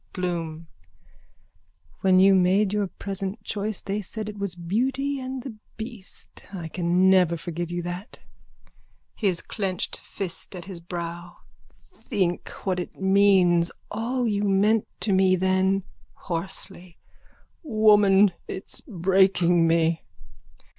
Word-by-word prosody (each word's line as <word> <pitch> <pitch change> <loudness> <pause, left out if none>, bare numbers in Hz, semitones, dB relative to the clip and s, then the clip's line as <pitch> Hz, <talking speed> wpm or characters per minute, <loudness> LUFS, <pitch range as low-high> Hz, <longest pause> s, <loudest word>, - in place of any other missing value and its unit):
BLOOM: 170 -3 -3 1.3
When 185 -1 +4
you 195 +1 +7
made 190 +2 +3
your 205 -1 0
present 195 +2 -5
choice 210 -1 -3
they 205 +1 -3
said 215 +2 -6
it 210 -1 -9
was 200 -3 -3
beauty 265 +11 -1
and 260 -1 -5
the 260 -4 -6 0.2
beast. 220 -3 -9
I 175 -5 -6
can 175 +2 +2
never 180 -3 +4
forgive 170 +1 -5
you 175 0 -3
for 175 - -4
that. 180 +6 -8 0.9
(His 190 -6 0
clenched 190 -3 -2
fist 195 0 -4
at 175 - -7
his 190 -3 -8
brow.) 170 0 -6 0.3
Think 175 -3 -3 0.2
what 185 -2 0
it 175 - -7
means. 190 -3 +4 0.2
All 240 +3 -1
you 205 -2 0
meant 205 +2 +2
to 205 - +1
me 190 0 +4
then. 190 +1 +1 0.3
(Hoarsely.) 180 0 -5 0.6
Woman, 210 - +5 0.2
it's 190 - -7
breaking 180 -4 +3
me! 165 0 +2
190 Hz, 125 wpm, -25 LUFS, 175-205 Hz, 1.3 s, you